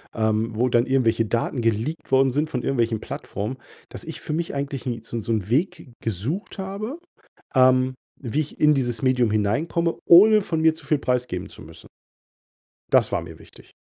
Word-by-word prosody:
ähm, 110 Hz, 0 st, +1 dB
wo 125 Hz, +3 st, +2 dB
dann 120 Hz, 0 st, +2 dB
irgendwelche 115 Hz, -4 st, +2 dB
Daten 120 Hz, +2 st, -1 dB
geleakt 115 Hz, +8 st, -2 dB
worden 135 Hz, 0 st, +4 dB
sind 150 Hz, +4 st, -1 dB
von 125 Hz, -, -3 dB
irgendwelchen 115 Hz, -4 st, 0 dB
Plattformen, 110 Hz, +7 st, -5 dB, 0.3 s
dass -, -, -8 dB
ich -, -, -7 dB
für 150 Hz, -, -5 dB
mich 165 Hz, -2 st, -3 dB
eigentlich 140 Hz, -2 st, -4 dB
nie 115 Hz, -2 st, -3 dB
so 115 Hz, -, -8 dB
'n 110 Hz, -, -4 dB
so 115 Hz, -, -3 dB
'n 105 Hz, -4 st, -1 dB
Weg 160 Hz, 0 st, -1 dB
gesucht 115 Hz, -, -4 dB
habe, 200 Hz, -, -5 dB, 0.6 s
ähm, 130 Hz, 0 st, +4 dB, 0.3 s
wie 140 Hz, +3 st, -2 dB
ich 150 Hz, -, -6 dB
in 150 Hz, 0 st, +5 dB
dieses 120 Hz, -4 st, -1 dB
Medium 125 Hz, -4 st, +2 dB
hineinkomme, 155 Hz, +11 st, 0 dB
ohne 210 Hz, +4 st, +7 dB
von 160 Hz, -4 st, -2 dB
mir 160 Hz, 0 st, +4 dB
zu 160 Hz, -3 st, -13 dB
viel 150 Hz, -1 st, +2 dB
preisgeben 125 Hz, -8 st, -2 dB
zu -, -, -11 dB
müssen. -, -, -12 dB, 1.1 s
Das -, -, +4 dB
war -, -, 0 dB
mir -, -, -11 dB
wichtig. -, -, -17 dB
130 Hz, 185 wpm, -23 LUFS, 115-155 Hz, 1.1 s, ohne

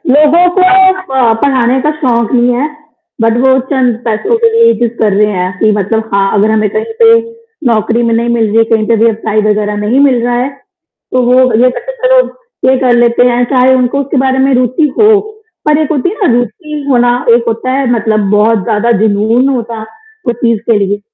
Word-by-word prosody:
लोगों 325 Hz, +4 st, +4 dB
को 375 Hz, -, +2 dB, 0.5 s
अ, 245 Hz, -4 st, +2 dB
पढ़ाने 260 Hz, -2 st, +1 dB
का 300 Hz, -, 0 dB
शौक 235 Hz, -5 st, 0 dB
नहीं 245 Hz, 0 st, +2 dB
है, 280 Hz, +5 st, -1 dB, 0.5 s
बट 225 Hz, +1 st, +1 dB
वो 260 Hz, 0 st, +4 dB
चंद 255 Hz, -4 st, +1 dB
पैसो 240 Hz, -, -1 dB
के 460 Hz, 0 st, +2 dB
लिए 460 Hz, 0 st, +3 dB
ये 465 Hz, -, +3 dB
चीज़ 235 Hz, -1 st, -1 dB
कर 210 Hz, -2 st, +1 dB
रहे 210 Hz, -, +2 dB
है, 180 Hz, 0 st, -2 dB
कि 215 Hz, -1 st, +2 dB
मतलब 220 Hz, +3 st, -2 dB
हाँ, 195 Hz, 0 st, +1 dB
अगर 215 Hz, +2 st, +1 dB
हमें 215 Hz, -1 st, 0 dB
कहीं 450 Hz, +1 st, -4 dB
पे 455 Hz, 0 st, +6 dB, 0.6 s
नौकरी 225 Hz, +2 st, 0 dB
में 230 Hz, -, 0 dB
नहीं 235 Hz, +1 st, -1 dB
मिल 235 Hz, -1 st, 0 dB
रही 210 Hz, +2 st, -1 dB
है, 225 Hz, -, +5 dB
कही 215 Hz, -1 st, +1 dB
पे 230 Hz, -, +1 dB
व्यवसाय 220 Hz, -1 st, -1 dB
वगैरह 210 Hz, 0 st, -1 dB
नहीं 250 Hz, +6 st, +1 dB
मिल 265 Hz, -4 st, +2 dB
रहा 245 Hz, 0 st, -1 dB
है, 250 Hz, +3 st, -1 dB
तो 330 Hz, -3 st, -8 dB
वो 255 Hz, -, +4 dB, 0.2 s
ये 255 Hz, -, +4 dB
कहते -, -, -7 dB, 0.2 s
चलो, -, -, +4 dB, 0.5 s
ये 265 Hz, -, +2 dB
कर 250 Hz, -2 st, +2 dB
लेते 240 Hz, 0 st, +2 dB
हैं, 245 Hz, 0 st, 0 dB
चाहे 255 Hz, +1 st, +3 dB
उनको 255 Hz, +2 st, -1 dB
उसके 280 Hz, 0 st, -4 dB
बारे 265 Hz, 0 st, 0 dB
में 275 Hz, -, +1 dB
रुचि 255 Hz, +5 st, +1 dB
हो 430 Hz, -, +5 dB, 0.6 s
और 300 Hz, -, +3 dB
एक 305 Hz, -, -2 dB
होती 290 Hz, +2 st, -1 dB
है 405 Hz, -, -6 dB
ना -, -, +2 dB
रुचि 300 Hz, -, -4 dB
होना 245 Hz, -2 st, +2 dB, 0.3 s
एक 235 Hz, -, 0 dB
होता 230 Hz, +3 st, -2 dB
है 270 Hz, +1 st, -1 dB
मतलब 220 Hz, -2 st, 0 dB
बहुत 215 Hz, +2 st, +2 dB
ज़्यादा 225 Hz, +2 st, -1 dB
जुनून 220 Hz, +4 st, +1 dB
होता, 230 Hz, -4 st, -4 dB, 0.5 s
उस 240 Hz, -, +1 dB
चीज़ 230 Hz, -2 st, +1 dB
के 220 Hz, -, +3 dB
लिए, 200 Hz, +1 st, -2 dB
240 Hz, 215 wpm, -10 LUFS, 225-275 Hz, 0.6 s, पे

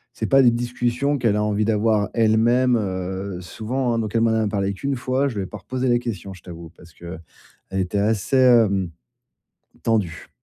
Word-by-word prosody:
c'est -, -, -3 dB
pas 135 Hz, -1 st, +5 dB
des 120 Hz, -, +6 dB
discussions 120 Hz, +4 st, -1 dB
qu'elle 115 Hz, -5 st, +1 dB
a 105 Hz, -, +1 dB
envie 105 Hz, 0 st, 0 dB
d'avoir, 110 Hz, -2 st, +1 dB
elle-même, 115 Hz, +3 st, +3 dB
heu, 95 Hz, -1 st, -4 dB
souvent, 120 Hz, +7 st, -2 dB
hein, -, -, 0 dB
donc 110 Hz, -1 st, -3 dB
elle 115 Hz, -, +2 dB
m'en 115 Hz, -, +3 dB
a 110 Hz, -1 st, +1 dB
parlé 100 Hz, -1 st, -1 dB
qu'1 140 Hz, +5 st, -2 dB
fois, 130 Hz, +3 st, 0 dB
je 115 Hz, -6 st, -5 dB
lui 95 Hz, -, -1 dB
ai -, -, -8 dB
pas 105 Hz, -, -8 dB
reposé 130 Hz, +6 st, -3 dB
la 120 Hz, -, +4 dB
question, 105 Hz, -5 st, -5 dB
je -, -, -17 dB
t'avoue, 85 Hz, -2 st, -10 dB
parce 85 Hz, -2 st, -17 dB
qu'elle 85 Hz, 0 st, -9 dB, 0.6 s
était 95 Hz, +2 st, -1 dB
assez, 110 Hz, +5 st, +1 dB
hem, 110 Hz, -8 st, +4 dB, 0.9 s
tendue. 100 Hz, -7 st, -1 dB
110 Hz, 195 wpm, -22 LUFS, 95-120 Hz, 0.9 s, des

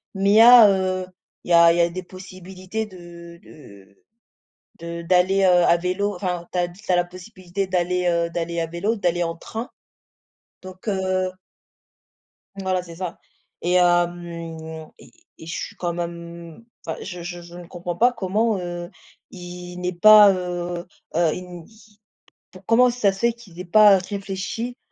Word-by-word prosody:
mais 195 Hz, +1 st, +1 dB
il -, -, +4 dB
y -, -, +8 dB
a 235 Hz, -2 st, +9 dB
heu, 185 Hz, -1 st, -1 dB, 0.4 s
il -, -, -11 dB
y -, -, +5 dB
a 170 Hz, 0 st, +7 dB
il 170 Hz, -, -1 dB
y -, -, +6 dB
a 170 Hz, -, +2 dB
des 185 Hz, +2 st, -6 dB
possibilités 185 Hz, +3 st, -7 dB
de 170 Hz, -3 st, -13 dB
de 100 Hz, -9 st, -16 dB, 0.8 s
de 170 Hz, 0 st, -6 dB
d'aller, 185 Hz, +2 st, +2 dB
heu, 180 Hz, -1 st, +5 dB
à 170 Hz, -, +4 dB
vélo 185 Hz, +4 st, -2 dB
enfin, 180 Hz, -3 st, -3 dB
tu -, -, -4 dB
as 175 Hz, -, +1 dB
tu 185 Hz, +2 st, -7 dB
as -, -, +4 dB
la 175 Hz, -, +1 dB
possibilité 185 Hz, +1 st, -6 dB
d'aller 180 Hz, 0 st, 0 dB
heu, 170 Hz, -1 st, +1 dB
d'aller 170 Hz, 0 st, -3 dB
à 165 Hz, -, -1 dB
vélo, 185 Hz, +8 st, -2 dB
d'aller 175 Hz, -3 st, 0 dB
en 165 Hz, 0 st, -3 dB
train, 225 Hz, +7 st, -7 dB, 0.9 s
donc, 185 Hz, +2 st, -12 dB
heu 185 Hz, -2 st, -1 dB, 1.2 s
Voilà, 190 Hz, -2 st, -1 dB
c'est 170 Hz, -1 st, -12 dB
ça, 180 Hz, -1 st, -6 dB, 0.4 s
et 175 Hz, +1 st, 0 dB
hem, 175 Hz, -1 st, +2 dB, 0.7 s
et -, -, -17 dB, 0.3 s
et -, -, -10 dB
je 165 Hz, -, -6 dB
suis -, -, -6 dB
quand 175 Hz, -1 st, -3 dB
même 170 Hz, -1 st, -7 dB
mmh, 230 Hz, -, -19 dB, 0.2 s
enfin 160 Hz, -, -4 dB
je 180 Hz, -3 st, -7 dB
je 175 Hz, 0 st, -7 dB
je 175 Hz, 0 st, -13 dB
ne 175 Hz, -1 st, -10 dB
comprends 175 Hz, 0 st, -6 dB
pas 240 Hz, +7 st, +4 dB
comment, 215 Hz, 0 st, 0 dB
heu, 175 Hz, 0 st, -6 dB, 0.4 s
ils 180 Hz, 0 st, -9 dB
n'aient 180 Hz, 0 st, -3 dB
pas 210 Hz, +2 st, +8 dB
heu, 175 Hz, -1 st, -4 dB, 0.3 s
heu, 170 Hz, -2 st, +2 dB
ils 180 Hz, -2 st, -9 dB
ils 215 Hz, -1 st, -22 dB, 0.7 s
comment 245 Hz, +2 st, +4 dB
ça 235 Hz, -5 st, +1 dB
se 195 Hz, -, -11 dB
fait 235 Hz, +1 st, +2 dB
qu'ils 195 Hz, -7 st, -16 dB
aient 180 Hz, -, -6 dB
pas 210 Hz, +2 st, +6 dB
réfléchi 200 Hz, +5 st, -5 dB
180 Hz, 175 wpm, -22 LUFS, 175-195 Hz, 1.2 s, a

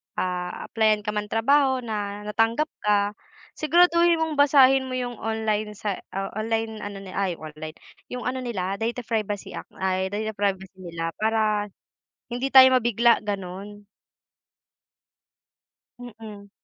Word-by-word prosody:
ah, 180 Hz, -1 st, -3 dB
apply-an 215 Hz, -2 st, +2 dB
ka 210 Hz, -, -2 dB
ng 210 Hz, 0 st, -3 dB
trabaho 260 Hz, +4 st, +3 dB
na 205 Hz, -2 st, -4 dB
natanggap 230 Hz, +8 st, +1 dB, 0.2 s
ka, 205 Hz, -1 st, +3 dB, 0.5 s
siguraduhin 340 Hz, +1 st, +4 dB
mong 315 Hz, -2 st, -1 dB
basahin 270 Hz, -2 st, +5 dB
mo 255 Hz, -, -4 dB
'yong 245 Hz, -2 st, -4 dB
online 215 Hz, -1 st, -2 dB
sa 205 Hz, -1 st, -3 dB, 0.2 s
o -, -, -1 dB, 0.2 s
online 225 Hz, 0 st, -2 dB
ano 200 Hz, -1 st, -7 dB
ay 190 Hz, -2 st, -1 dB
online, 155 Hz, 0 st, -9 dB, 0.3 s
'yong 250 Hz, -1 st, -6 dB
ano 260 Hz, +1 st, -2 dB
nila 200 Hz, -6 st, -3 dB
data 235 Hz, +2 st, -2 dB
privacy 210 Hz, -3 st, -3 dB
act -, -, -8 dB
ay 190 Hz, 0 st, 0 dB
data 215 Hz, +2 st, -3 dB
privacy 195 Hz, -2 st, -2 dB
nila 165 Hz, -2 st, -4 dB
para, 215 Hz, -1 st, +1 dB, 0.6 s
hindi 245 Hz, +3 st, -2 dB
tayo 260 Hz, -1 st, +10 dB
mabigla 235 Hz, -1 st, +3 dB
ganun. 200 Hz, +1 st, -6 dB, 2.2 s
Mm. 220 Hz, -4 st, -10 dB
215 Hz, 130 wpm, -25 LUFS, 200-245 Hz, 2.2 s, tayo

